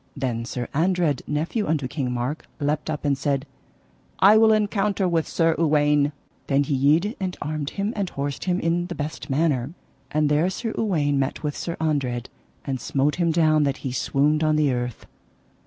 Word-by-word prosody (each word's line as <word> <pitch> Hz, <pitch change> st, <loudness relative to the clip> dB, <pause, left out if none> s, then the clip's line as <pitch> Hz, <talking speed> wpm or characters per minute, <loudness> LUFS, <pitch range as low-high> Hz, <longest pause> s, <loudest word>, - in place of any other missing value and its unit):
Then 120 Hz, -4 st, -2 dB
Sir 120 Hz, 0 st, -4 dB
Andred, 165 Hz, -3 st, +1 dB
nephew 160 Hz, +9 st, -1 dB
unto 150 Hz, -4 st, 0 dB
King 130 Hz, -2 st, -3 dB
Mark, 125 Hz, +5 st, -3 dB
leapt 150 Hz, +1 st, -1 dB
up 150 Hz, -1 st, -3 dB
and 140 Hz, -1 st, +2 dB
said: 140 Hz, +1 st, -1 dB, 0.7 s
I 200 Hz, +3 st, +7 dB
will 220 Hz, 0 st, +6 dB
encounter 205 Hz, -2 st, +1 dB
with 165 Hz, -2 st, 0 dB
Sir 165 Hz, -1 st, +2 dB
Uwaine. 150 Hz, -2 st, +3 dB, 0.4 s
Then 140 Hz, 0 st, +3 dB
he 140 Hz, -, -2 dB
yede 155 Hz, -, +2 dB
and 185 Hz, -2 st, -3 dB
armed 150 Hz, -1 st, -3 dB
him 200 Hz, +3 st, -1 dB
and 200 Hz, -3 st, -1 dB
horsed 140 Hz, 0 st, -4 dB
him 180 Hz, 0 st, +1 dB
in 170 Hz, +1 st, 0 dB
the 175 Hz, -, -5 dB
best 150 Hz, +1 st, -5 dB
manner. 140 Hz, 0 st, 0 dB, 0.3 s
And 150 Hz, +1 st, +1 dB
there 150 Hz, +5 st, +2 dB
Sir 225 Hz, +4 st, -4 dB
Uwaine 150 Hz, -10 st, +1 dB
met 135 Hz, +2 st, -2 dB
with 150 Hz, -1 st, -2 dB
Sir 170 Hz, -, -4 dB
Andred, 135 Hz, -6 st, -1 dB, 0.4 s
and 135 Hz, -3 st, -3 dB
smote 140 Hz, +5 st, 0 dB
him 170 Hz, -2 st, +2 dB
down 155 Hz, -2 st, +3 dB
that 140 Hz, -1 st, +1 dB
he 130 Hz, -, -1 dB
swooned 145 Hz, +4 st, +1 dB
on 155 Hz, 0 st, +3 dB
the 150 Hz, -3 st, +2 dB
earth. 125 Hz, -2 st, -4 dB
150 Hz, 185 wpm, -24 LUFS, 140-170 Hz, 0.7 s, I